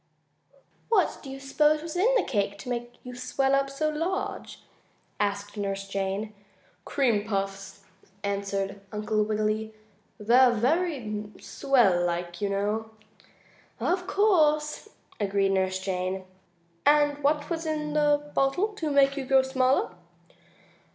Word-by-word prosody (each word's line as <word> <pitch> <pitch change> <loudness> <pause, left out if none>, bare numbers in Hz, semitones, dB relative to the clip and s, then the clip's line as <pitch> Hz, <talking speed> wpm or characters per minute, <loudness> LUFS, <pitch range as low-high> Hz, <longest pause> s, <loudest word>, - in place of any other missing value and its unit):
"What 405 -7 +2
do 275 - -9
you 270 0 -7
s'pose 300 +3 +2
was 330 0 -6
in 400 +8 +3
the - - +2
cake 200 -4 -1
to 250 - -8
make 240 0 -4
you 250 - -8
swell 270 +2 0
up 275 0 +2
so 280 +3 -1
large?" 330 +5 -3 0.6
asked 205 0 -2
Nurse 195 -1 -3
Jane. 195 +2 -3 0.5
"Cream 235 -7 +1
puffs," 195 -1 -4 0.4
answered 200 0 -2
Uncle 215 0 -1
Wiggily. 215 +1 -1 0.4
"They're 245 +4 +5
very 240 -5 -1
swell 235 -11 +2
like, 175 0 -3
you 200 - 0
know." 210 +3 -1 0.9
"Of 360 +1 0
course," 310 -6 +2 0.3
agreed 200 -1 +1
Nurse 190 -1 +1
Jane. 185 0 -3 0.6
"And 290 -1 +3
what 295 +2 +1
was 330 -1 -2
in 300 -1 -2
the 295 -1 +2
bottle 275 +10 +2
to 375 -7 -4
make 275 -1 +4
you 280 - -3
grow 265 0 +4
smaller?" 260 -4 +1
245 Hz, 130 wpm, -27 LUFS, 200-295 Hz, 0.9 s, They're